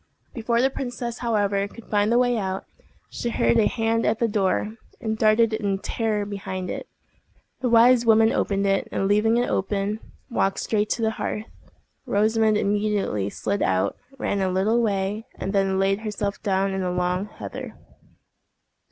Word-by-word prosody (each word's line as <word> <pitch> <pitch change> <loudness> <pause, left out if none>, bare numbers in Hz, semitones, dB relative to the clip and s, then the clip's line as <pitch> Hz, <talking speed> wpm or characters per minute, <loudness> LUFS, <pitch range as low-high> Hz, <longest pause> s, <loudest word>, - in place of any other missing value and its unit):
Before 235 0 0
the 265 - +3
princess, 245 -2 -5
however, 205 -4 0
could 230 +2 -13
find 205 +1 +1
the 240 - +4
way 245 0 +3
out, 190 -3 -3 0.5
she 240 - -3
heard 115 - +2
a 215 - +4
hand 225 0 0
at 215 - +1
the 235 - +1
door, 210 0 0 0.3
and 220 -1 -2
darted 220 +1 +3
in 200 -3 0
terror 210 0 -1
behind 190 -2 -5
it. - - -6 0.7
The 250 - 0
wise 235 +1 +6
woman 225 -1 +5
opened 200 0 0
it, 195 0 +1
and, 195 - 0
leaving 215 +3 +3
it 245 - +1
open, 200 +2 -1 0.3
walked 195 -6 0
straight 210 -1 0
to 230 - -3
the 220 - +2
hearth. 210 - -3 0.6
Rosamond 215 +1 +2
immediately 205 - 0
slid 200 - -2
out, 95 0 +1 0.2
ran 200 -5 -1
a 190 - +1
little 205 +6 +2
way, 205 0 -1
and 195 - -4
then 195 -1 +2
laid 195 +1 +2
herself 210 -2 -3
down 195 -1 0
in 190 - -2
the 180 - -1
long 180 +2 -1
heather. - - -8
210 Hz, 170 wpm, -24 LUFS, 195-225 Hz, 0.7 s, wise